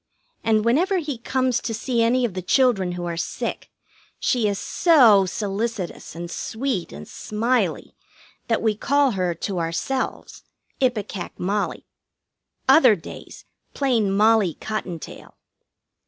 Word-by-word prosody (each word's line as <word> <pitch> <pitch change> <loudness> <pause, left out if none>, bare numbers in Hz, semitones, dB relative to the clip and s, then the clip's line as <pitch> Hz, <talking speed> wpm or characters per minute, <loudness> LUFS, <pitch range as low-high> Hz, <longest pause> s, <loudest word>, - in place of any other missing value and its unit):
And 220 -1 +2
whenever 350 - +2
he 295 -8 -3
comes 255 0 0
to 225 - -3
see 235 +1 -1
any 245 +2 +3
of 220 - -3
the 185 - -4
children 195 -4 +2
who 175 0 -5
are 170 -1 -3
sick - - -4 0.5
she 235 -4 +1
is 200 -1 -1
so 230 - +5
solicitous 205 -3 -4
and 170 +1 -6
sweet 225 -4 -3
and 75 +1 -9
smiley 235 +4 -1 0.5
that 230 -2 0
we 220 -1 +3
call 280 +4 +2
her, 180 -4 -1
to 190 0 -3
ourselves, 170 +11 -3 0.4
Ipecac 210 -7 -2
Mollie. 200 +3 -2 0.8
Other 255 -9 +7
days, 170 - -11 0.3
plain 235 -8 +1
Mollie 210 -3 +3
Cottontail. 185 -6 -6
220 Hz, 125 wpm, -23 LUFS, 190-255 Hz, 0.8 s, Other